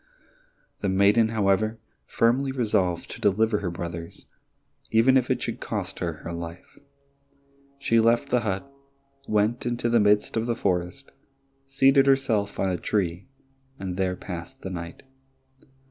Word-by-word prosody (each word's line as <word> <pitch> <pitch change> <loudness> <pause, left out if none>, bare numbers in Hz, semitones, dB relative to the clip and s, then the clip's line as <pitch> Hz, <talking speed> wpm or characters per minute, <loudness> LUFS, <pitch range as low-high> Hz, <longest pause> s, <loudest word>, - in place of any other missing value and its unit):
The 100 - -1
maiden, 100 +4 +4
however, 110 0 +1 0.3
firmly 130 +4 +2
resolved 105 -9 0
to - - -9
deliver 105 +2 +2
her 95 -4 -3
brothers, 85 -1 -7 0.6
even 115 +4 +4
if 130 -1 +2
it - - 0
should - - -4
cost - - -4
her - - -1
her 85 - -8
life. 85 +1 -8 1.0
She 115 -4 +2
left 115 +5 +3
the 125 - +3
hut, 105 +1 -3 0.6
went 105 +3 +1
into 120 0 -1
the 120 0 +4
midst 105 0 +3
of 115 +1 -1
the 120 - 0
forest, 90 -5 -2 0.6
seated 135 0 +4
herself 115 -7 +1
on 95 - +1
a 90 - -1
tree, 90 +1 -2 0.5
and 95 -2 -5
there 95 -1 0
passed 85 -2 -8
the 95 - -5
night. 85 -1 -7
105 Hz, 145 wpm, -25 LUFS, 90-120 Hz, 1.0 s, maiden